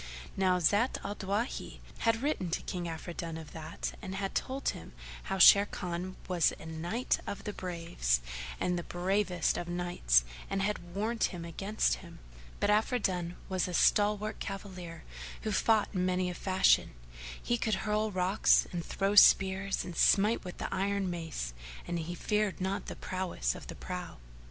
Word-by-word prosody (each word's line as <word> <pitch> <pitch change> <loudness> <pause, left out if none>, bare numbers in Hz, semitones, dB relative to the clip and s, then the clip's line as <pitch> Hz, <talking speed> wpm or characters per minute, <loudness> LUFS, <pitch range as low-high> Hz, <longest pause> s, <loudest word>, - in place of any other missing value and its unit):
Now 185 -1 +3
Zat 205 +8 +2
al 205 - -3
Dawahi 205 +6 -3 0.2
had 230 +1 +1
written 280 - 0
to 165 - -2
King 180 -2 -4
Afridun 165 0 -5
of 160 -2 -10
that 160 -1 -5
and 190 -2 -5
had 195 0 -3
told 265 +1 -1
him - - -7 0.3
how 195 - -2
Sharrkan 185 -2 +5
was 175 -4 +3
a - - -10
Knight 170 +10 -1
of 200 - -5
the 210 - -4
Braves 170 - -1 0.4
and 180 -1 0
the - - -5
bravest 180 0 0
of 175 - -5
knights 175 - +2 0.3
and 195 0 0
had 185 -4 -3
warned 220 +3 +1
him 170 -2 -5
against 180 - 0
him; - - -12 0.4
but 205 - +2
Afridun 190 -6 +1
was 185 -1 0
a 180 - -3
stalwart 210 +2 +3
cavalier 185 -4 -7 0.4
who 215 - -1
fought 215 +1 +3
in 180 -2 0
many 185 0 +1
a - - -5
fashion; 185 - +3 0.4
he 240 - 0
could 220 -4 -1
hurl 215 +1 +1
rocks 185 +1 +3
and 175 -2 -3
throw 195 +3 -1
spears 195 -1 +5
and 175 -2 -7
smite 210 +7 +4
with 180 - -8
the - - -4
iron 195 -1 0
mace 160 - -4 0.3
and 175 - -2
he 170 +2 -4
feared 210 +2 0
not 190 +1 -2
the - - -5
prowess 185 - -2
of - - -10
the - - -7
prow. - - -6
185 Hz, 165 wpm, -31 LUFS, 175-205 Hz, 0.4 s, Sharrkan